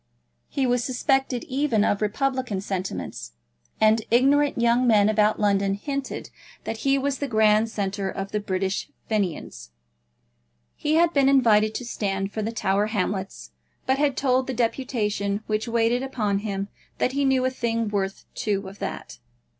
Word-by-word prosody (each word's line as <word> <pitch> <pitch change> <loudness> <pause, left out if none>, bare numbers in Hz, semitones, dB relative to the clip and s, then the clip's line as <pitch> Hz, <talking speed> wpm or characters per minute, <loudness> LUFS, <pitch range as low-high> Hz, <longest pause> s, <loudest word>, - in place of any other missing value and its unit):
He 270 - 0
was 245 -1 +1
suspected 265 -1 0
even 260 -5 +1
of 205 - 0
republican 255 0 -1
sentiments, 185 - -5 0.5
and 220 +1 +4
ignorant 280 +4 +3
young 235 +2 +3
men 210 -3 +5
about 215 0 +2
London 200 -1 +2
hinted 275 +5 -5 0.3
that 225 - -4
he 275 +4 +2
was 275 0 -1
the 285 - -2
grand 215 -1 +3
centre 200 -2 -2
of 195 +1 -5
the 210 - 0
British 190 -1 -2 0.2
Fenians. 175 - -3 1.1
He 300 +1 0
had 340 +1 +4
been 275 -1 +4
invited 220 -5 +4
to 250 - -4
stand 195 -4 -2
for 220 - -2
the 220 +2 -2
Tower 205 -2 +1
Hamlets, 190 - -3 0.3
but 265 +1 +1
had 285 -3 +1
told 260 -1 +2
the 260 - -3
deputation 220 -4 -1
which 215 +2 -1
waited 235 +1 +1
upon 215 -7 -1
him 200 -1 -4 0.3
that 255 - +1
he 280 +2 0
knew 265 -1 +2
a 260 - +1
thing 230 -3 -1
worth 195 -2 -2
two 200 -2 -2
of 195 +2 -11
that. - - -6
220 Hz, 160 wpm, -24 LUFS, 200-260 Hz, 1.1 s, men